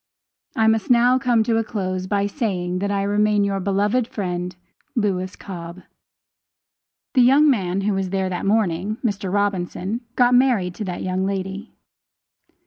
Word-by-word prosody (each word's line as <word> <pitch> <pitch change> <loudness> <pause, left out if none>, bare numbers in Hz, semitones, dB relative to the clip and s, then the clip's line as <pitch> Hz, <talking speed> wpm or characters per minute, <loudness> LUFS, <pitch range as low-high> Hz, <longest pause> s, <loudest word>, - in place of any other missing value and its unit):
I 220 - +2
must 220 -2 +2
now 245 +1 +5
come 240 -4 +2
to 225 0 +1
a 225 - +1
close 185 -4 -3
by 200 0 +1
saying 185 -6 -2
that 200 +1 -1
I 200 -1 0
remain 210 +1 +2
your 200 -1 0
beloved 205 +5 +1
friend, 180 -4 -4 0.4
LEWIS 190 -5 -1
COBB. 175 -1 -9 1.3
The 260 - +5
young 275 +5 +6
man 195 -8 +1
who 205 +1 0
was 190 -1 -2
there 190 0 -1
that 180 +1 -3
morning, 205 -1 0
Mr. 200 -4 -2
Robinson, 200 +2 -1
got 245 0 +4
married 245 -8 +3
to 210 - -5
that 180 -2 -4
young 185 +1 -1
lady. 195 +2 -5
200 Hz, 155 wpm, -22 LUFS, 185-225 Hz, 1.3 s, young